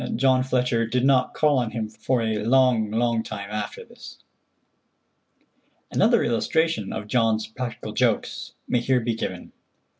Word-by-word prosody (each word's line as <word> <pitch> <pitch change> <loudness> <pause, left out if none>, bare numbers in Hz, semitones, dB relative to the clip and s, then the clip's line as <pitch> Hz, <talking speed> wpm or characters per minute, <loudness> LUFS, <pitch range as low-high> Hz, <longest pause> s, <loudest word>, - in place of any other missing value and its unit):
John 130 +1 +3
Fletcher 125 -3 0
did 125 +2 0
not 135 -2 +2
call 150 -3 +3
on 120 -3 -1
him 110 -1 -4
for 115 +3 -1
a 110 -2 -1
long, 120 -2 +3
long 115 +1 +1
time 105 -2 -7
after 105 -1 -5
this. - - -13 1.7
Another - - +3
illustration 120 -1 0
of 105 - -5
John's 110 -1 +1
practical 115 +1 -6
jokes - - -1
may 125 - +1
here 125 +1 +1
be 115 0 -1
given. 115 - -5
115 Hz, 145 wpm, -24 LUFS, 110-130 Hz, 1.7 s, John